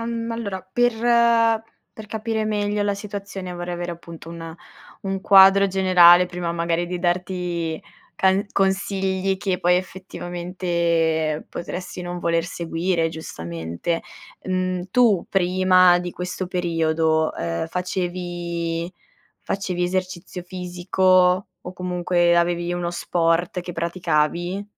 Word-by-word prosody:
al 230 +1 -3
ma 230 0 -3
allora 200 -5 -5
per 245 +1 +3 1.0
per 215 -1 -10
capire 220 0 -2
meglio 205 -1 0
la 205 0 0
situazione 200 -2 -6
vorrei 175 0 -5
avere 175 0 -4
appunto 165 -1 -11
un 165 -1 -8 0.5
un 195 -1 -3
quadro 195 0 +7
generale, 180 -2 +6
prima 175 -1 -4
magari 170 0 -1
di 180 0 -4
darti 175 -2 -2 0.4
can 190 +1 +3
consigli 195 0 0
che 190 -2 -1
poi 180 0 +4
effettivamente 170 -3 -1
potresti 180 +1 -6
non 175 0 -5
voler 170 -1 0
seguire, 170 0 -1
giustamente. 85 - -4 0.4
Mhmm, 185 -1 -1
tu 225 -7 +3
prima 185 -1 +4
di 175 0 -4
questo 180 +1 -4
periodo, 160 -3 +1
ehm, 85 - -3
facevi 175 -1 -3 0.5
facevi 185 -2 -2
esercizio 185 0 -3
fisico, 180 +1 +2
o 180 - -8
comunque 175 -1 +1
avevi 175 0 0
uno 175 -1 -2
sport 175 +1 0
che 175 0 -7
praticavi? 170 +2 -1
180 Hz, 115 wpm, -22 LUFS, 170-190 Hz, 1.0 s, quadro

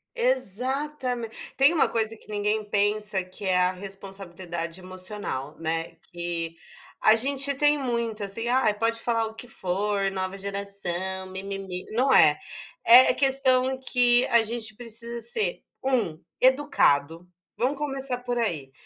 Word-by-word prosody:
Exatamen 265 - -1 0.3
tem 275 +4 +5
uma 325 - +3
coisa 225 -1 -1
que - - -18
ninguém 210 +1 0
pensa 205 -1 0
que 185 +2 -9
é 185 -1 +2
a 180 0 +3
responsabilidade 185 -3 -7
emocional, 185 -6 -6
né, 165 0 -3 0.2
que, 170 -1 -4 0.5
a 215 - +7
gente 275 +3 0
tem 295 +2 +3
muito 235 -5 -2
assim: 200 +4 -3
"Ai, 245 -3 +3
pode 230 +1 +1
falar 230 -1 0
o 220 - -6
que 225 +2 -10
for, 195 0 -1
Nova 190 0 -3
geração, 190 -2 -4
'mi, 190 0 -7
mi, 195 0 -5
mi'", 185 -2 -6
não 260 +4 +3
é. 150 -1 +6 0.5
É 245 +3 +8
questão 265 -1 +2
que 245 -1 +3
a 235 -1 +4
gente 220 -1 -4
precisa 235 +1 -4
ser 430 - -1 0.2
1: 235 -12 0 0.2
educado. 180 - +3 0.3
Vamos 255 +4 +1
começar 270 -3 -2
por 245 -1 -3
aí. 165 - -2
215 Hz, 145 wpm, -26 LUFS, 185-250 Hz, 0.5 s, É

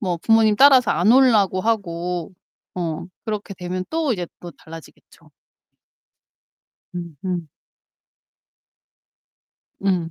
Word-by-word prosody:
뭐 180 -4 -1
부모님 220 +3 +3
따라서 265 -3 +6
안 205 +7 +3
오려고 215 -8 +4
하고 180 -5 -2 0.4
어 170 -1 -4 0.2
그렇게 210 -2 -5
되면 180 +1 -5
또 320 -5 0
이제 180 -4 -4
또 175 - -9
달라지겠죠. 165 -1 -15 1.6
음 170 -4 -7
음. 175 -4 -3 2.3
음 180 -4 0
185 Hz, 185 characters per minute, -21 LUFS, 170-220 Hz, 2.3 s, 따라서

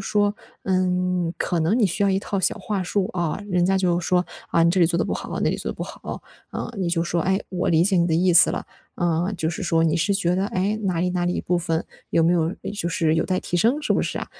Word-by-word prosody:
说， 205 +1 +1 0.3
嗯， 180 -2 0
可 175 - -1
能 175 +9 +2
你 220 - +4
需 185 +3 -2
要 - - +3
一 190 0 +2
套 200 -1 -3
小 185 - +1
话 200 -3 -3
术 190 +1 0
啊， 175 -1 -1
人 180 -1 +2
家 195 0 +2
就 175 -2 +1
说， 180 +1 +1 0.2
啊， 165 - +2
你 170 - +4
这 185 - +1
里 170 - +6
做 170 - 0
的 - - +1
不 - - -3
好， - - -4
那 - - +2
里 - - -2
做 - - -4
的 - - -7
不 - - -5
好。 - - -7 0.3
呃， - - -5
你 180 -2 0
就 170 -1 +1
说， 170 0 -1
哎， 190 +3 +1
我 180 -1 -1
理 165 0 +4
解 190 0 +2
你 170 0 +3
的 160 - +1
意 180 +1 +3
思 170 - +7
了， - - -3 0.3
呃， 175 +2 0
就 160 -1 -1
是 170 - -6
说 165 -1 +2
你 160 +1 +2
是 195 +4 +1
觉 180 -3 +1
得， 195 +1 0
哎， 205 +3 -1
哪 180 -3 0
里 180 +1 +1
哪 175 -1 -1
里 175 - +1
一 - - -1
部 180 0 0
分 165 -1 -1 0.3
有 165 - +3
没 170 +2 +4
有 170 +1 +1 0.2
就 170 -4 -2
是 160 -1 +1
有 - - +1
待 185 -1 0
提 175 - -2
升， 245 - +2
是 - - +1
不 - - +2
是 - - -3
啊？ - - -4
180 Hz, 305 characters per minute, -23 LUFS, 170-190 Hz, 0.3 s, 思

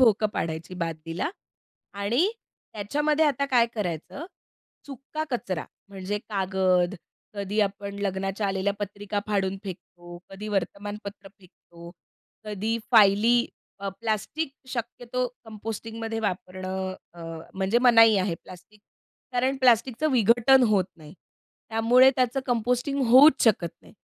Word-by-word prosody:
भोकं 220 -3 +5
पाडायची 165 +2 -4
बादलीला 165 - -3 0.7
आणि 245 - +2 0.4
त्याच्यामध्ये 295 +9 +1
आता 280 -2 +1
काय 235 -1 +5
करायचं? 200 - -4 0.6
सुक्का 280 +3 -6
कचरा 185 -9 -3 0.2
म्हणजे 200 +1 -4
कागद, 190 -2 +1 0.4
कधी 200 +1 -1
आपण 200 0 -2
लग्नाच्या 195 +1 -2
आलेल्या 195 +1 0
पत्रिका 205 0 -4
फाडून 195 -2 0
फेकतो, 175 -2 -10
कधी 205 +2 -7
वर्तमानपत्र 200 +1 -4
फेकतो, 170 -2 -15 0.5
कधी 215 +2 -2
फाइली 220 +2 +6 0.4
अ, 200 - -3
प्लास्टिक 230 +8 -2 0.2
शक्यतो 245 +1 -3 0.2
कंपोस्टिंगमध्ये 225 +1 -5
वापरणं 185 -1 -3 0.2
अ, 175 - -17 0.4
म्हणजे 190 +4 +1
मनाई 225 -3 +7
आहे 185 -2 0
प्लास्टिक. 185 +4 -14 0.5
कारण 260 +2 +1
प्लास्टिकचं 255 +3 +3
विघटन 240 +3 +5
होत 195 -4 +3
नाही, 155 -1 -13 0.6
त्यामुळे 240 +4 +5
त्याचं 255 +1 +1
कंपोस्टिंग 250 +4 0
होऊच 265 +4 +7
शकत 190 -7 +3
नाही. - - -17
210 Hz, 110 wpm, -26 LUFS, 190-240 Hz, 0.7 s, मनाई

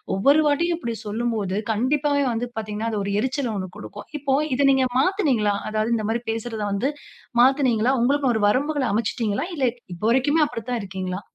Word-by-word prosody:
ஒவ்வொரு 280 +10 +4
வாட்டியும் 330 +4 +1
இப்பிடி 235 -7 -3
சொல்லும் 230 +3 -1
போது, 195 -2 -2 0.2
கண்டிப்பாவே 285 +5 +1
வந்து 235 +2 -2
பார்த்தீங்கன்னா, 215 +1 -3
அது 210 - -1
ஒரு 200 - -2
எரிச்சல் 260 -2 -1
1 185 -2 -5
கொடுக்கும். 205 - -9
இப்போ 275 -1 +1 0.2
இத 280 +1 +3
நீங்க 265 -1 +3
மாத்துனீங்களா? 270 - +2
அதாவது 215 +2 0
இந்தமாரி 225 +2 -1
பேசுறத 225 -1 -4
வந்து 245 +8 0 0.5
மாத்துனீங்களா? 255 -2 +3
உங்களுக்குன்னு 270 0 +2
ஒரு 220 - 0
வரம்புகள 280 +2 0
அமச்சுடீங்களா? 220 +3 -1
இல்ல, 270 -3 +1 0.3
இப்ப 170 - -14
வரைக்குமே 290 +5 +3
அப்பிடிதான் 240 -1 -4
இருக்கீங்களா? 190 0 -4
240 Hz, 165 wpm, -23 LUFS, 215-275 Hz, 0.5 s, ஒவ்வொரு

